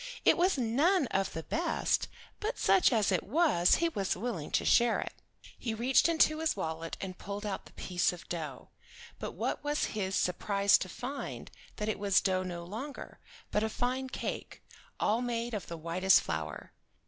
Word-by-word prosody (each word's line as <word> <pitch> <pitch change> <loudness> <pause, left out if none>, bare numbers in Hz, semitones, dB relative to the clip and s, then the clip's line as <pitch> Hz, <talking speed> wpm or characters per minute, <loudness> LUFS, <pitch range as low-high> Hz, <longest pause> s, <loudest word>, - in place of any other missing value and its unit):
It - - +7
was 360 -2 +2
none 280 - +3
of 195 -1 0
the 160 - -4
best, 340 - 0 0.3
but 445 +4 -2
such 370 - +4
as 215 -5 +2
it 185 - +2
was 255 - +3
he 335 - +2
was 195 - -1
willing 200 -8 -3
to - - 0
share 235 -1 +4
it. - - -4 0.5
He 225 -3 -2
reached 250 +8 +3
into 310 -1 +3
his 320 -1 +1
wallet 160 +1 -4
and 185 -2 -6
pulled 205 +1 -5
out 200 -2 -4
the - - -17
piece 180 -1 0
of 180 - -10
dough, 155 -6 -5 0.5
but - - -5
what - - -2
was 295 0 0
his 195 -3 -1
surprise 200 +3 +3
to 185 - -4
find 260 +8 -6 0.2
that 210 - -3
it 215 - -1
was 200 -2 +4
dough 185 -1 +1
no 175 -2 -5
longer, 225 +11 -7 0.3
but 210 - +2
a 220 - 0
fine 255 +3 -2
cake, - - -5 0.4
all 225 +3 +2
made 240 -1 -2
of 205 -5 -4
the 170 - -6
whitest 175 +4 +4
flour. 80 -2 -5
210 Hz, 185 wpm, -31 LUFS, 185-260 Hz, 0.5 s, It